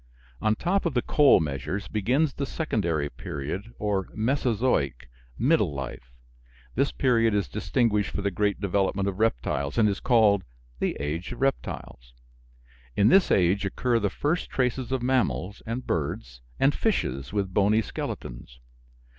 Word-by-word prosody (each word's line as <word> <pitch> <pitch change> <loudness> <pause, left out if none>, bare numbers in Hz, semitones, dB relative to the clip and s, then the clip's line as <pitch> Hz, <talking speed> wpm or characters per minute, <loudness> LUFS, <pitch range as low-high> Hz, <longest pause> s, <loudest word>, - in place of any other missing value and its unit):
On 110 0 +2
top 180 - 0
of 155 - -4
the 120 - +2
coal 145 -2 +5
measures 80 +7 -3
begins 130 +9 +1
the 140 - -3
Secondary 85 - -1
period, 75 +11 -6
or 100 -3 -1
"Mesozoic" 110 - 0 0.3
(middle 115 - +2
life). 65 -2 -7 0.6
This 140 +3 +1
period 115 -4 +2
is 100 - 0
distinguished 105 -2 0
for 100 - -4
the 100 - 0
great 100 +2 0
development 100 0 0
of 100 0 -3
reptiles, 70 - 0
and 110 - +5
is 100 -1 -1
called 110 -6 +4 0.4
the - - -1
"age 75 +5 -3
of 120 - -10
reptiles." 60 - -3 0.8
In 100 +2 +4
this 190 +6 +5
age 95 +2 +3
occur 115 +5 0
the 100 -2 0
first 155 - -1
traces 130 0 -1
of 130 -2 -1
mammals, 125 -6 0
and 120 +3 -3
birds, 60 -6 -3 0.2
and 135 +2 +4
fishes 70 - -1
with 100 -3 -2
bony 105 +3 +3
skeletons. - - -7
105 Hz, 145 wpm, -26 LUFS, 85-125 Hz, 0.8 s, coal